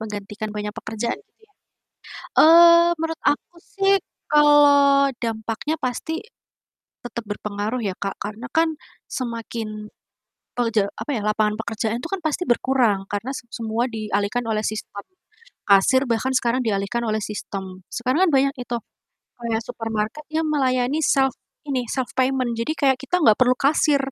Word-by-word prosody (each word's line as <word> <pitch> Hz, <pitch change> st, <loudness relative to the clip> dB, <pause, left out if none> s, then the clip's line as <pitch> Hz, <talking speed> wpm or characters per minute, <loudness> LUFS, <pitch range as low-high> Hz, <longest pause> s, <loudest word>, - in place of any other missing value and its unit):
menggantikan 210 Hz, 0 st, -6 dB
banyak 210 Hz, 0 st, -4 dB
pekerjaan 225 Hz, +2 st, -4 dB
gitu -, -, -36 dB
ya, 425 Hz, -, -34 dB, 0.9 s
eee, 340 Hz, +1 st, +8 dB
menurut 325 Hz, 0 st, -3 dB
aku 320 Hz, +4 st, 0 dB
sih 390 Hz, +1 st, +1 dB, 0.3 s
kalau 285 Hz, -2 st, +6 dB
dampaknya 225 Hz, +5 st, -2 dB
pasti, 285 Hz, +7 st, -3 dB, 0.8 s
tetep 235 Hz, -1 st, -6 dB
berpengaruh 210 Hz, +3 st, -3 dB
ya 195 Hz, -, -1 dB
Kak 195 Hz, -1 st, -3 dB
karena 215 Hz, +3 st, -6 dB
kan, 320 Hz, 0 st, +2 dB, 0.3 s
semakin, 225 Hz, -3 st, -5 dB, 0.7 s
eee, 240 Hz, -, +1 dB
je 210 Hz, -, +4 dB
apa 295 Hz, -, -5 dB
ya, 220 Hz, -, -2 dB
lapangan 210 Hz, 0 st, +1 dB
pekerjaan 225 Hz, 0 st, -2 dB
itu 290 Hz, -, -6 dB
kan 390 Hz, -2 st, -2 dB
pasti 315 Hz, +3 st, -1 dB
berkurang 240 Hz, -4 st, +2 dB
karena 205 Hz, +6 st, -3 dB
se -, -, -7 dB
semua 225 Hz, 0 st, -2 dB
dialihkan 215 Hz, +1 st, -1 dB
oleh 215 Hz, -1 st, -1 dB
sistem, 210 Hz, -1 st, -5 dB, 0.6 s
kasir 200 Hz, +7 st, +4 dB
bahkan 255 Hz, +3 st, 0 dB
sekarang 245 Hz, 0 st, +1 dB
dialihkan 200 Hz, +2 st, -1 dB
oleh 215 Hz, 0 st, 0 dB
sistem, 195 Hz, -3 st, -6 dB
sekarang 260 Hz, +10 st, +1 dB
kan -, -, +2 dB
banyak 275 Hz, +1 st, +3 dB
itu, 245 Hz, -1 st, -3 dB, 0.7 s
kayak 225 Hz, -1 st, -1 dB
supermarket 225 Hz, +5 st, -4 dB
yang 315 Hz, +1 st, 0 dB
melayani 270 Hz, 0 st, +1 dB
self 270 Hz, -3 st, +3 dB, 0.3 s
ini, 265 Hz, -3 st, -1 dB
self 260 Hz, -2 st, -2 dB
payment 255 Hz, -2 st, +1 dB
jadi 230 Hz, +7 st, -1 dB
kayak 265 Hz, -3 st, +3 dB
kita 360 Hz, +6 st, 0 dB
gak 220 Hz, -5 st, +6 dB
perlu 255 Hz, 0 st, +4 dB
kasir, 290 Hz, +1 st, +3 dB
240 Hz, 145 wpm, -22 LUFS, 215-280 Hz, 0.9 s, eee